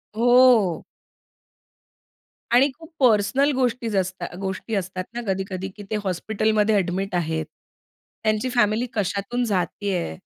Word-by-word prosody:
हो. 240 Hz, -7 st, +4 dB, 1.7 s
आणि 265 Hz, +4 st, +6 dB
खूप 325 Hz, 0 st, -13 dB
पर्सनल 260 Hz, +4 st, +3 dB
गोष्टी 245 Hz, -2 st, 0 dB
असतात 185 Hz, -2 st, -3 dB
गोष्टी 195 Hz, +3 st, -3 dB
असतात 185 Hz, -1 st, -3 dB
ना, 240 Hz, -, -4 dB
कधी-कधी 190 Hz, 0 st, -2 dB
की 205 Hz, -, -8 dB
ते 215 Hz, -, 0 dB
हॉस्पिटलमध्ये 215 Hz, +3 st, +1 dB
एडमिट 185 Hz, +1 st, -1 dB
आहेत. 160 Hz, -2 st, -1 dB, 0.8 s
त्यांची 215 Hz, +3 st, +1 dB
फॅमिली 235 Hz, 0 st, +2 dB
कशातून 205 Hz, +4 st, -1 dB
जातीये? 190 Hz, -, -2 dB
205 Hz, 110 wpm, -23 LUFS, 185-240 Hz, 1.7 s, आणि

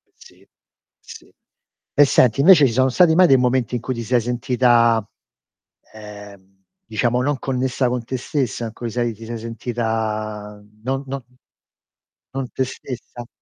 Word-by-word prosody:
Sì. -, -, -19 dB, 0.5 s
Sì. -, -, -14 dB, 0.6 s
E 145 Hz, -, +7 dB
senti, 130 Hz, -2 st, +3 dB
invece 165 Hz, -2 st, +7 dB
ci 115 Hz, -, -3 dB
sono 130 Hz, +1 st, +3 dB
stati 165 Hz, +4 st, +4 dB
mai 180 Hz, +1 st, +6 dB
dei 135 Hz, -4 st, +6 dB
momenti 125 Hz, -1 st, 0 dB
in 120 Hz, -, -3 dB
cui 130 Hz, -, -3 dB
ti 115 Hz, -1 st, -5 dB
sei 125 Hz, +2 st, +2 dB
sentita, 120 Hz, -2 st, +2 dB, 0.9 s
ehm, 100 Hz, -2 st, -13 dB, 0.2 s
diciamo 120 Hz, -, 0 dB
non 140 Hz, +1 st, -1 dB
connessa 130 Hz, -1 st, -1 dB
con 125 Hz, -1 st, -2 dB
te 130 Hz, +3 st, -4 dB
stessa? 125 Hz, -2 st, -2 dB
In 110 Hz, -, -7 dB
cui 120 Hz, +1 st, -5 dB
sei 120 Hz, 0 st, -1 dB
ti 115 Hz, +1 st, -12 dB
sei 115 Hz, +1 st, -5 dB
sentita 110 Hz, -3 st, -4 dB, 0.2 s
non 135 Hz, +2 st, -2 dB
non 135 Hz, 0 st, -5 dB
n 125 Hz, -, -31 dB, 1.0 s
non 135 Hz, -1 st, -4 dB
te 130 Hz, -, -1 dB
stessa? 120 Hz, -2 st, -9 dB
120 Hz, 155 wpm, -21 LUFS, 110-130 Hz, 1.0 s, E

